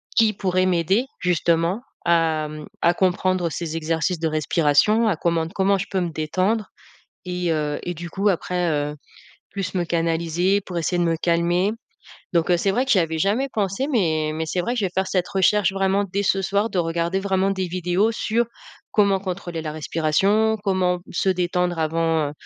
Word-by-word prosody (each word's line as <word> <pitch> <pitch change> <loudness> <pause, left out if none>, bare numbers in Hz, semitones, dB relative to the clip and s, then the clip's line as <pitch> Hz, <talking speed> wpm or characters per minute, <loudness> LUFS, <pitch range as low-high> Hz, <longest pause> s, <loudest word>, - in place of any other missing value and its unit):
qui 220 -2 +4
pourraient 185 -2 0
m'aider, 185 +6 +2
justement, 175 +3 +1 0.2
à 165 -2 +2
mmh, 150 0 -8 0.2
à 170 - +4
comprendre 185 -2 +1
ces 165 +2 -4
exercices 165 +3 -1
de 165 - 0
respiration, 160 +8 +2
à 205 - +2
comment 165 0 0
comment 195 0 +2
je 195 - -3
peux 190 - 0
me 175 - -1
détendre 185 +7 -1 0.6
et 180 -1 -1
heu, 150 -2 -1
et 175 - -3
du 175 +1 -7
coup 200 +4 +1
après, 180 -1 -1
heu, 150 0 -1 0.5
plus 195 -1 -4
me 180 -2 0
canaliser 170 +3 0
pour 180 -2 -5
essayer 170 +2 -1
de 175 - +2
me 165 - +1
calmer. 175 +4 +1 0.6
Donc 170 -1 +1
heu, 175 - +5
c'est 195 +3 +1
vrai 250 +5 +1
que 265 - -4
j'y 200 - +5
avais 160 -2 0
jamais 210 - +1
pensé 200 +4 -1
mais 160 - +1
mais 160 +1 -2
c'est 180 - -1
vrai 235 +8 -1
que 245 - -1
je 200 - +1
vais - - -5
faire 190 0 +1
cette 180 -2 -1
recherche 195 0 +2
vraiment 195 +1 +1
dès 200 +1 -2
ce 195 0 +1
soir 200 +3 +1
de 195 - -3
regarder 170 +2 0
vraiment 195 0 +1
des 190 -2 -2
vidéos 180 +4 +1
sur 225 +1 0 0.5
comment 200 -2 +3
contrôler 180 -3 -5
la 155 - -4
respiration, 190 +8 +1
comment 185 -2 +1
se 185 - 0
détendre 180 -1 0
avant, 160 -1 +1
heu, - - -9
180 Hz, 190 wpm, -22 LUFS, 165-195 Hz, 0.6 s, heu